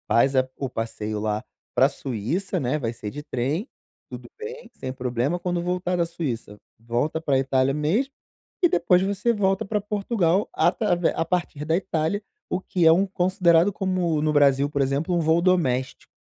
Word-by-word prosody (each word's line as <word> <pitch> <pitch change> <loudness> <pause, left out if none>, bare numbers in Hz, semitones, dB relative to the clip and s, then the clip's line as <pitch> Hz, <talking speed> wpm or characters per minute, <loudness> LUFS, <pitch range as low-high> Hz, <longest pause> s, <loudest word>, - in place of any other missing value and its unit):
Faz 135 +4 +3
a 130 0 +3
o 135 - -3
passeio 110 -2 -4
lá 105 0 -1 0.3
pra 135 - +5
Suíça, 140 - -3
né, 130 +1 0
vai 120 -6 -2
ser 110 -2 -6
de 145 +6 -7
trem, 145 - -2 0.4
tudo - - -9
bem, 465 +2 -8
sem 130 - -6
problema, 130 +5 -1
quando 175 0 -1
voltar 180 0 -1
da 170 -1 +1
Suíça, 135 -11 -5 0.2
volta 120 +8 -2
pra 140 -4 +2
Itália 135 0 +2
mesmo, 175 - 0 0.5
e - - +8
depois 175 - +3
você 200 +4 +1
volta 195 -3 +1
pra 210 +2 0
Portugal 200 -2 0
atravé 175 +1 +2
a - - +1
partir 170 -4 -2
da 160 +1 +2
Itália, 190 +1 -1 0.3
o 180 - 0
que 180 -2 0
é 160 - +8
um 185 +4 +4
considerado 180 -1 +3
como, 180 -5 0
no 155 0 +1
Brasil, 140 -1 +4
por 140 -1 -1
exemplo, 140 +6 0
um - - +2
voo 160 +1 +3
doméstico, 135 -9 0
165 Hz, 175 wpm, -24 LUFS, 135-185 Hz, 0.5 s, e